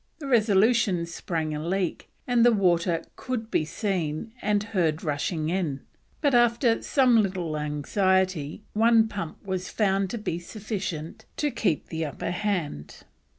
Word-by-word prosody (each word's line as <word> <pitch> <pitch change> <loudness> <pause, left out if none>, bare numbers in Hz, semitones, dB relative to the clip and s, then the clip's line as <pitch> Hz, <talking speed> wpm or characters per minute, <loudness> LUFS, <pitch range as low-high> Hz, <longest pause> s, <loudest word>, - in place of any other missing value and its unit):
The 300 - -8
Resolution 215 -5 +3
sprang 165 -2 -3
a 150 0 -4
leak, 185 +1 -2 0.2
and 245 -2 +3
the 240 - +7
water 175 -5 +2
could 235 -4 -4
be - - +2
seen 175 +2 -2
and 210 -1 +1
heard 175 -7 0
rushing 155 +1 -1
in, 165 -7 -1 0.4
but 285 -3 +2
after 240 0 +3
some 250 -5 +4
little 180 -6 -2
anxiety 165 +3 0
one 225 +1 +5
pump 200 -4 -6
was 185 -1 -3
found 195 -2 +1
to 235 - -3
be 175 -6 -3
sufficient 185 -5 -5
to 295 -1 0
keep 210 - -1
the 160 0 -3
upper 150 +3 -4
hand. 180 - -3
190 Hz, 145 wpm, -26 LUFS, 165-220 Hz, 0.4 s, the